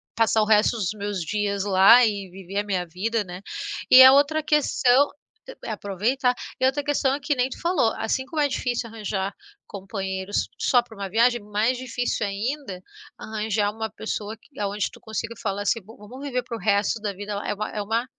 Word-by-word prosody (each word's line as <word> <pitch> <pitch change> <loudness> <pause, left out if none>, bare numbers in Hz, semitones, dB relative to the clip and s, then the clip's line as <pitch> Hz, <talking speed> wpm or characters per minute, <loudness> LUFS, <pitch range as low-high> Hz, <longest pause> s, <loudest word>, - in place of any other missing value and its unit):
passar 225 -1 +3
o - - +2
resto 215 +1 +4
dos 195 -5 -1
meus 205 -1 -3
dias 200 +2 -1
lá 200 +5 +7
e 200 -3 -2
viver 190 +1 -8
a 205 - -2
minha 185 -3 -1
vida, 210 +6 -1
né? 180 -1 -8 0.5
E 255 - +11
a 260 - +10
outra 290 +3 +3
questão, 285 -3 +3 0.6
é - - -4
aproveitar 225 +6 0 0.3
e - - +4
outra 275 +2 +1
questão 285 -2 +1
é - - -5
que 290 +1 -1
nem 250 0 +1
tu - - -9
falou, 335 -10 +2
assim 260 +4 -1
como 310 +3 -5
é 290 - +3
difícil 245 -3 -2
arranjar 205 -3 -3 0.3
companheiros 195 0 -3
só 250 - +4
para 235 -2 -15
uma 200 -1 -5
viagem, 235 +3 +3
mais 210 +4 0
difícil 245 -3 -2
ainda 205 0 -4 0.4
arranjar 215 -1 -1
uma 220 +1 -4
pessoa 220 0 -5
que 275 - -17
aonde 205 0 -1
tu - - -15
consiga 225 +1 -4
falar 200 +1 -2
assim, 215 +3 +1
vamos 225 +5 -12
viver 250 -3 -2
para 240 -1 -6
o - - -11
resto 205 +3 +1
da 205 -2 -3
vida 205 +2 -6
é - - -1
uma 215 +1 -4
é - - 0
uma 225 +4 -1
220 Hz, 200 wpm, -24 LUFS, 200-250 Hz, 0.6 s, E